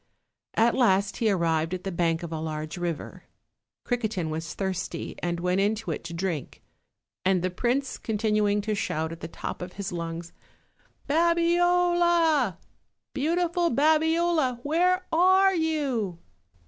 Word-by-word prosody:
At 230 +1 +4
last 200 -6 +2
he 225 - +2
arrived 165 -2 +1
at 180 - -8
the 195 - -3
bank 170 -1 0
of 170 - -6
a 160 - -3
large 155 0 -4
river. 175 -4 -5 0.6
Cri 245 - 0
quetin 200 -8 -2
was 165 +2 -5
thirsty, 190 -2 -3
and 175 -1 -2
went 180 +2 +1
into 210 +2 0
it - - -4
to 170 - -6
drink, 170 -4 -4 0.6
and 185 -2 +2
the 185 - 0
prince 250 +8 -1
continuing 210 -1 +1
to 215 +1 -2
shout 160 -5 -2
at 165 - -8
the - - -6
top 165 - -6
of 180 0 -6
his 200 -1 -5
lungs: 170 0 -5 0.7
"Babiola! 340 - +3 0.6
beautiful 340 +4 +1
Babiola, 315 -1 +2
where 360 +5 +2
are 375 +3 +5
you?" 285 - -1
215 Hz, 140 wpm, -26 LUFS, -, 0.7 s, are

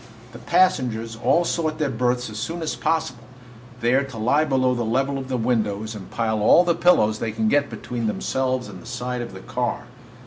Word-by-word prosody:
The - - -11
passengers 120 -11 +1
all 170 +9 +2
sought 155 -2 -1
their 150 -3 0
berths 125 +1 0
as 105 - -6
soon 165 +8 -4
as 160 - -2
possible, 150 -7 -1 0.6
there 125 +4 +3
to 130 -4 -10
lie 125 +8 +2
below 130 -4 +2
the 120 - -2
level 135 +5 0
of 130 - -7
the 130 - 0
windows 110 -2 -1
and 105 -3 -9
pile 110 -2 -1
all 135 +11 +6
the 175 -1 +2
pillows 135 -11 +3
they 115 - -2
could 110 0 0
get 145 0 +2
between 120 -2 -4
themselves 130 +3 -1
and - - -10
the - - -13
side 125 0 -3
of 120 - -6
the 95 - -9
car. - - -2
125 Hz, 205 wpm, -23 LUFS, 110-140 Hz, 0.6 s, all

